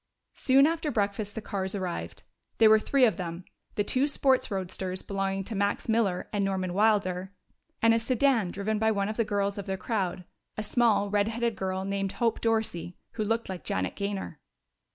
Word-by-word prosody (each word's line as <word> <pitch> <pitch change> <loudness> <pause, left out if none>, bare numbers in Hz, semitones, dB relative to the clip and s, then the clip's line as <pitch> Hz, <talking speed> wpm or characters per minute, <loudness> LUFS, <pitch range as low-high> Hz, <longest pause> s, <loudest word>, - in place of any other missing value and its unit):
Soon 270 0 +4
after 325 -1 0
breakfast 205 -3 -1
the 225 - -5
cars 190 0 -3
arrived. 185 -3 -4 0.3
There 220 -1 +7
were 220 - +7
three 265 +4 +3
of 220 - +1
them 175 -1 -5 0.3
the 205 - +1
two 260 +7 +1
sports 270 -2 +2
roadsters 185 -1 -4
belonging 195 -1 -2
to 220 - -6
Max 200 0 -1
Miller 220 -5 +1
and 205 -1 +1
Norman 190 -2 -1
Wilder, 195 -2 +1 0.5
and 230 0 +6
a 230 - +3
sedan 240 -3 +2
driven 205 +3 -2
by 220 0 +3
one 200 -2 0
of 215 - -4
the 230 - +3
girls 200 -1 -1
of 200 - -6
their 190 0 -2
crowd, 185 -3 -2 0.3
a 215 - -2
small, 215 -3 +2
red 205 0 +2
haired 230 0 -1
girl 190 0 -2
named 195 -1 -2
Hope 230 -2 0
Dorsey, 220 -6 -1
who 220 - -2
looked 225 +2 -1
like 185 -4 -6
Janet 95 0 -2
Gaynor. 200 -5 -4
205 Hz, 190 wpm, -28 LUFS, 190-225 Hz, 0.5 s, There